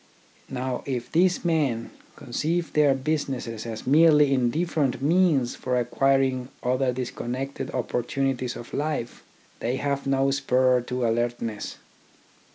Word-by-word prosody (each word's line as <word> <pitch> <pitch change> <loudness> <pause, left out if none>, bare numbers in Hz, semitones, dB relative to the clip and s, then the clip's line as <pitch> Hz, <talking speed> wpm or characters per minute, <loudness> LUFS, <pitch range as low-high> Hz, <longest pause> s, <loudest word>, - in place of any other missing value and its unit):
Now 130 -1 -3
if 125 -3 -3
these 180 +2 +2
men 140 -9 0 0.2
conceive 160 +7 -2
their 145 -3 +4
businesses 130 -6 -3
as 110 -1 -6
merely 150 0 +5
indifferent 140 +2 0
means 150 -4 +2
for 125 -1 -2
acquir 135 +3 +2
ing 130 -1 -2
other 125 +1 +1
disconnected 130 +2 -4
opportunities 125 +1 -2
of 120 - -10
life, 145 -5 -3 0.4
they 120 +2 -1
have 140 0 -2
no 135 0 +2
spur 130 -2 +2
to 125 -1 -1
alertness. 115 -2 -2
130 Hz, 120 wpm, -25 LUFS, 125-145 Hz, 0.4 s, merely